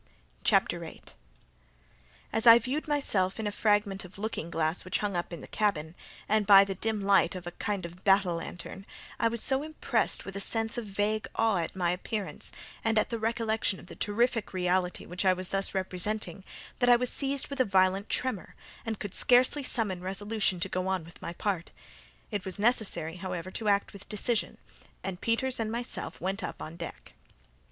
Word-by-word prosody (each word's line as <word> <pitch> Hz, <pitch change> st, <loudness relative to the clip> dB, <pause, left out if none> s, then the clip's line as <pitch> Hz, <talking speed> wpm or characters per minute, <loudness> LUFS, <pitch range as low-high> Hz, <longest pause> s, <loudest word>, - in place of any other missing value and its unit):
CHAPTER -, -, +2 dB
8 -, -, -11 dB, 1.2 s
As 225 Hz, +2 st, +1 dB
I 230 Hz, 0 st, +12 dB
viewed 265 Hz, +6 st, -2 dB
myself 220 Hz, -10 st, 0 dB
in 220 Hz, -, -2 dB
a 205 Hz, -, 0 dB
fragment 205 Hz, -2 st, +1 dB
of 180 Hz, +1 st, -12 dB
looking 200 Hz, -5 st, -3 dB
glass 160 Hz, +1 st, -1 dB
which 185 Hz, -, -1 dB
hung 205 Hz, -3 st, -2 dB
up 175 Hz, 0 st, -2 dB
in 170 Hz, -, -6 dB
the -, -, -9 dB
cabin, 165 Hz, -7 st, 0 dB, 0.3 s
and 215 Hz, -1 st, +2 dB
by 195 Hz, -1 st, +10 dB
the 195 Hz, -1 st, -3 dB
dim 215 Hz, +2 st, -1 dB
light 195 Hz, 0 st, +4 dB
of 180 Hz, -1 st, -7 dB
a 175 Hz, -, -4 dB
kind 200 Hz, 0 st, -3 dB
of 175 Hz, +2 st, -10 dB
battle 195 Hz, -3 st, +4 dB
lantern, 180 Hz, +3 st, -8 dB, 0.3 s
I 230 Hz, -, +4 dB
was 230 Hz, -1 st, +1 dB
so 265 Hz, 0 st, +2 dB
impressed 310 Hz, +1 st, -1 dB
with 195 Hz, -, -7 dB
a -, -, -2 dB
sense 225 Hz, +2 st, +1 dB
of 240 Hz, -2 st, -3 dB
vague 205 Hz, +2 st, -1 dB
awe 225 Hz, -3 st, +3 dB
at 165 Hz, -, -3 dB
my 175 Hz, -2 st, +1 dB
appearance, 200 Hz, +3 st, -2 dB, 0.3 s
and 225 Hz, -1 st, +2 dB
at 215 Hz, -, +2 dB
the 230 Hz, -, -2 dB
recollection 220 Hz, -2 st, 0 dB
of -, -, -13 dB
the -, -, -11 dB
terrific 230 Hz, +1 st, 0 dB
reality 180 Hz, 0 st, 0 dB
which 180 Hz, +3 st, -3 dB
I 185 Hz, -1 st, +5 dB
was 185 Hz, 0 st, -4 dB
thus 195 Hz, 0 st, 0 dB
representing, 190 Hz, 0 st, -2 dB, 0.4 s
that 245 Hz, -1 st, +4 dB
I 245 Hz, -, +9 dB
was 245 Hz, +1 st, +1 dB
seized 275 Hz, -1 st, 0 dB
with 280 Hz, -1 st, -6 dB
a -, -, +6 dB
violent 190 Hz, -1 st, +2 dB
tremour, 250 Hz, -8 st, -1 dB, 0.3 s
and 225 Hz, -2 st, -3 dB
could 205 Hz, -3 st, -5 dB
scarcely 255 Hz, +4 st, +4 dB
summon 215 Hz, -9 st, -1 dB
resolution 195 Hz, 0 st, -1 dB
to 195 Hz, -, +2 dB
go 185 Hz, 0 st, -2 dB
on 190 Hz, -4 st, 0 dB
with 165 Hz, -, -15 dB
my 170 Hz, -, -5 dB
part. 185 Hz, -2 st, -2 dB, 0.6 s
It 205 Hz, -3 st, -2 dB
was 190 Hz, +1 st, -4 dB
necessary, 200 Hz, -7 st, 0 dB
however, 180 Hz, -1 st, -5 dB
to 215 Hz, +2 st, -3 dB
act 200 Hz, -1 st, +2 dB
with 200 Hz, -, -12 dB
decision, 215 Hz, +1 st, 0 dB, 0.5 s
and 190 Hz, -2 st, -4 dB
Peters 245 Hz, +3 st, +1 dB
and 220 Hz, -1 st, -1 dB
myself 235 Hz, +1 st, -4 dB
went 190 Hz, +4 st, -2 dB
upon 155 Hz, -, -6 dB
deck. 170 Hz, -, -8 dB
200 Hz, 195 wpm, -29 LUFS, 185-225 Hz, 1.2 s, I